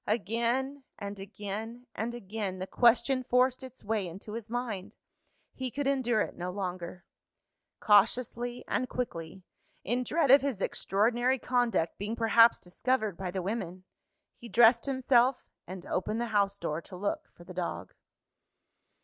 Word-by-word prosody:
Again, 235 +6 0
and 200 0 -6
again, 210 +4 -6
and 235 +2 -3
again, 200 -3 -4
the 185 - -4
question 250 +5 +3
forced 255 +1 +2
its 260 -1 -10
way 210 -3 -1
into 195 +5 -9
his 230 -1 -6
mind. 230 -6 -4 0.6
He 260 -1 -4
could 285 +4 -3
endure 255 -5 +2
it - - -3
no 180 +1 -4
longer. 180 -2 -5 0.7
Cautiously 240 +3 +2
and 255 - -1
quickly 185 -7 -5 0.4
in 245 +4 0
dread 300 0 +2
of 275 - +8
his 270 -7 -2
extraordinary 240 +7 +1
conduct 245 -10 0
being 210 +3 -3
perhaps 230 0 +5
discovered 215 +2 -1
by 185 +1 -4
the 185 0 -3
women 185 -3 -4 0.6
he 235 - -10
dressed 235 +2 +5
himself, 260 -1 +3 0.2
and 185 0 -8
opened 215 +4 -2
the 240 - 0
house 200 -1 +2
door 165 -3 -3
to 185 - -11
look 200 +3 -3
for 175 - -14
the 180 +1 -10
dog. 180 -1 -4
225 Hz, 150 wpm, -30 LUFS, 195-245 Hz, 0.7 s, of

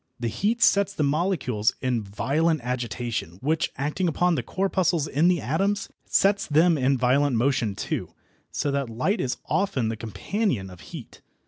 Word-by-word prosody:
The 120 -1 -1
heat 220 - 0
sets 200 0 +4
the 155 - 0
molecules 140 - 0
in 125 -3 0
violent 145 +10 0
agitation, 120 -7 -3
which, 155 +7 0
acting 150 +7 -1
upon 175 +2 +2
the - - 0
corpuscles 185 -5 0
in 155 +5 +2
the 180 -1 +3
atoms, 195 +9 -1 0.2
sets 200 +1 +2
them 160 +3 +4
in 135 -1 +2
violent 130 +2 +2
motion 115 -4 +1
too, - - -4 0.3
so 145 - -1
that 140 -3 -1
light 130 - 0
is 125 - -2
often 165 - 0
the 115 - -2
companion 115 - -2
of 90 - -12
heat. - - -11
140 Hz, 160 wpm, -25 LUFS, 120-180 Hz, 0.3 s, sets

